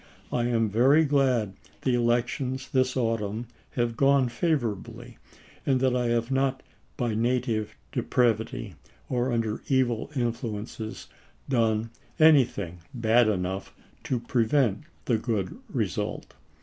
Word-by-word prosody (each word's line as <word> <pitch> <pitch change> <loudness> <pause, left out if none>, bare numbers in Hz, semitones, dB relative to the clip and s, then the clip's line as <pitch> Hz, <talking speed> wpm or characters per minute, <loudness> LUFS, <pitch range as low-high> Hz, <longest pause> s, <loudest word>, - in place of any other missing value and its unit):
I 120 -1 +1
am 115 -2 +2
very 130 +9 +4
glad 130 -8 +2 0.3
the 130 - +2
elections 120 +2 0
this 130 0 +1
autumn 115 -2 -1 0.3
have 120 -1 0
gone 135 -1 +4
favorably 120 - -2 0.4
and 135 -2 +2
that 130 -1 +2
I 125 -1 +1
have 115 +1 0
not 135 0 +1 0.3
by 120 -3 0
native 115 -1 0 0.2
depravity 115 -3 0 0.4
or 125 0 0
under 115 -2 -1
evil 130 -3 +1
influences 115 -2 -3 0.4
done 115 -3 +1 0.3
anything 125 - +4 0.2
bad 115 0 +4
enough 95 -1 -2 0.3
to 125 - 0
prevent 120 0 +1 0.2
the 115 -3 +2
good 105 -6 -2
result. - - -3
120 Hz, 115 wpm, -27 LUFS, 110-130 Hz, 0.4 s, very